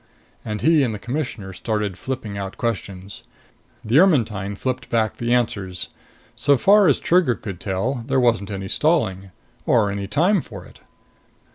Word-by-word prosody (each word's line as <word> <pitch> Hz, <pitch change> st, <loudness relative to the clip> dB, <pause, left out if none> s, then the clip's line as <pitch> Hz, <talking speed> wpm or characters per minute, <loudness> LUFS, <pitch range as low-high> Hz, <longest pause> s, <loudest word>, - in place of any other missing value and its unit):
And 105 Hz, -1 st, -4 dB
he 160 Hz, -1 st, +4 dB
and 120 Hz, -5 st, 0 dB
the -, -, -5 dB
Commissioner 120 Hz, -5 st, -4 dB
started 105 Hz, 0 st, -2 dB
flipping 115 Hz, -1 st, -5 dB
out 95 Hz, -1 st, -5 dB
questions. 100 Hz, -4 st, -4 dB, 0.6 s
The 120 Hz, +7 st, +4 dB
Ermetyne 110 Hz, -, +2 dB
flipped 130 Hz, +4 st, -4 dB
back 110 Hz, -2 st, 0 dB
the 120 Hz, 0 st, -2 dB
answers. 100 Hz, -7 st, -1 dB, 0.5 s
So 140 Hz, +5 st, +3 dB
far 200 Hz, +6 st, +5 dB
as 145 Hz, -, +3 dB
Trigger 170 Hz, -8 st, +3 dB
could 95 Hz, -3 st, -7 dB
tell, 115 Hz, +8 st, -2 dB
there 135 Hz, -1 st, +2 dB
wasn't 115 Hz, -5 st, +2 dB
any 95 Hz, -1 st, -5 dB
stalling. 100 Hz, -, 0 dB, 0.4 s
Or 105 Hz, -4 st, +3 dB
any 100 Hz, 0 st, -4 dB
time 175 Hz, -, +2 dB
for 100 Hz, -9 st, -10 dB
it. -, -, -17 dB
115 Hz, 155 wpm, -22 LUFS, 100-135 Hz, 0.6 s, far